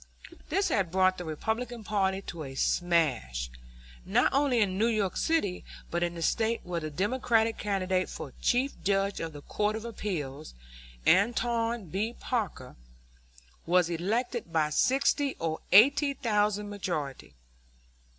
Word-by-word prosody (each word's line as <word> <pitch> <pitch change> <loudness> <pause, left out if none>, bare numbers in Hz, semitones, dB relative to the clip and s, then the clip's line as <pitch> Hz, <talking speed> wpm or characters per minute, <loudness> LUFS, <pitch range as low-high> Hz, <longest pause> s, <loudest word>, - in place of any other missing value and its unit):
This 390 0 +1
had 190 -4 +1
brought 185 +1 +2
the 175 - -5
Republican 220 +9 -3
party 195 -2 0
to 170 -4 -7
a 135 -2 -8
smash, 130 - 0 0.5
not - - +2
only 275 -3 +3
in 195 -4 +1
New 220 +4 +2
York 215 -5 0
City, 265 - 0 0.3
but 175 - -1
in 175 0 -1
the 165 - -4
State, 225 +6 +1
where 175 -1 -3
the 155 -1 -5
Democratic 225 - +1
candidate 190 -2 0
for 135 - -7
Chief 255 +3 +2
Judge 195 0 +1
of 165 -1 -4
the 145 -2 -11
Court 210 +1 -1
of 220 +1 -6
Appeals, 155 - -5 0.5
Alton 230 +1 +2
B. 215 +7 -2
Parker, 200 - -3 0.9
was 175 0 +3
elected 215 +4 -2
by 155 -2 +1
sixty 275 - +2
or 160 -1 -3
eighty 280 +7 +6
thousand 210 -3 0
majority. 175 -9 -4
195 Hz, 140 wpm, -29 LUFS, 170-230 Hz, 0.9 s, eighty